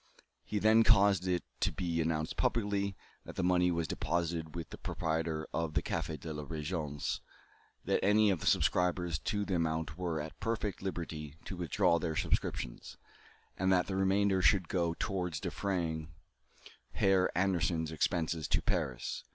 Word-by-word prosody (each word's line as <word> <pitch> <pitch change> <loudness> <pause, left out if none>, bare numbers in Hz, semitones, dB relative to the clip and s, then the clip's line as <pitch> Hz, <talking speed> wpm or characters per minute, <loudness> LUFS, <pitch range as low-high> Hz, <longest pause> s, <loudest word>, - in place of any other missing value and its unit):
He 105 - -3
then 110 +2 +5
caused 100 -3 +5
it 90 -1 +1 0.2
to - - +1
be 85 -2 -1
announced 80 -1 -1
publicly, 100 -5 0 0.3
that - - -10
the - - -1
money 90 0 +4
was 85 -2 0
deposited 85 0 -2
with 85 -1 -6
the - - -8
proprietor 80 -1 -2
of 80 -2 -2
the 75 - +2
Café 80 -2 -3
de 80 +2 -6
la 75 0 -5
Régence, 75 -1 -3 0.7
that - - +1
any 105 +1 +5
of 90 - 0
the - - -4
subscribers 90 -2 +2
to 105 -1 -1
the 95 - -2
amount 80 -1 -1
were 85 -3 -1
at 75 +1 -7
perfect 110 -3 -2
liberty 80 -6 -5
to 95 - -5
withdraw 85 -1 +2
their 80 -1 -2
subscriptions, - - -2 0.6
and 95 0 +2
that 90 -1 +4
the 95 - -3
remainder 95 0 +3
should 95 -2 +4
go 85 -2 0
towards 90 -5 -2
defraying 85 -4 -2 0.9
Herr 95 -1 +3
Anderssen's 85 -4 +1
expenses 80 0 0
to - - +2
Paris. - - -2
85 Hz, 160 wpm, -33 LUFS, 80-95 Hz, 0.9 s, then